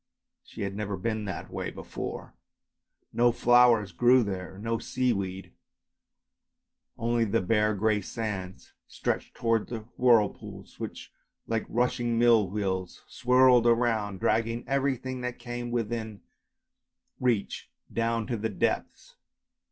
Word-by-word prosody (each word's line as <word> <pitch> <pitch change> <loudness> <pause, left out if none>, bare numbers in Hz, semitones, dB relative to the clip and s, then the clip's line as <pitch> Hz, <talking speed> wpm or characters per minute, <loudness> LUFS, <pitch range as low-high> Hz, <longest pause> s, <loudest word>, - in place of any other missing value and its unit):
She - - -8
had 100 0 -3
never 100 -1 -3
been 110 +2 -2
that 95 - -6
way - - -3
before; - - -7 0.8
no 120 0 +4
flowers 120 -4 +4
grew 120 +6 +5
there, 95 -2 -5
no 115 +2 -2
seaweed, 100 -7 -2 1.4
only 115 0 +1
the 115 +1 +1
bare 105 +2 +2
grey 105 +1 +1
sands 95 -3 -5
stretched - - -3
towards 115 -2 0
the 115 -2 -4 0.2
whirlpools, 115 -5 +1
which - - -7 0.3
like 115 -1 -2
rushing 120 0 0
mill 115 -4 +4
wheels 95 -3 -3
swirled 125 -1 +4
round, 115 -5 +1
dragging 115 +1 0
everything 130 -1 -1
that 125 0 -4
came 120 0 -5
within 110 -3 -3 1.0
reach 120 -5 -1 0.2
down 115 -1 0
to 120 -1 -2
the 110 +1 -2
depths. 100 - -2
115 Hz, 120 wpm, -28 LUFS, 105-120 Hz, 1.4 s, grew